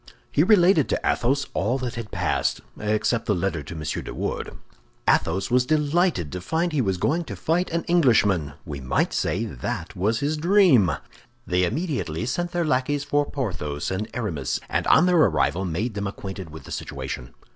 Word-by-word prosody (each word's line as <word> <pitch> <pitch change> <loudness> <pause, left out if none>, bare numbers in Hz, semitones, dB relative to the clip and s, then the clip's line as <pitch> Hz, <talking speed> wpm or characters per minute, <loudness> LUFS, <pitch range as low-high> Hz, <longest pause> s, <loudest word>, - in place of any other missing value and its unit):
He 145 - +3
related 180 - +5
to - - +1
Athos 140 +4 +1
all 115 +8 0
that 125 -3 -4
had 115 -3 -6
passed, - - 0 0.2
except 110 +2 0
the 105 - +2
letter 85 -3 -1
to 75 +4 -8
M. 80 - -6 0.2
de - - -7
Wardes. - - -4 0.5
Athos 95 +6 +2
was 125 0 +3
delighted 155 - +1
to 90 - -5
find 165 - 0
he 150 -3 +1
was 95 -5 0
going 160 - +1
to - - -6
fight 175 +3 0
an 170 0 -1
Englishman. 105 - +3
We 70 -2 -6
might 65 -1 0
say 110 +5 0
that 65 - -5
was 110 +5 +1
his 150 +2 -1
dream. 165 - +5 0.5
They 90 0 +2
immediately 125 - -2
sent 175 +8 -1
their 175 -1 0
lackeys 140 0 +1
for 145 0 0
Porthos 80 - -3
and 100 +3 -2
Aramis, 85 - -2
and - - -1
on 160 - +6
their 180 -1 +4
arrival 95 - +2
made 100 +8 -2
them 100 0 -3
acquainted 95 -3 -7
with 80 +1 -10
the - - -11
situation. - - -6
115 Hz, 180 wpm, -24 LUFS, 90-155 Hz, 0.5 s, on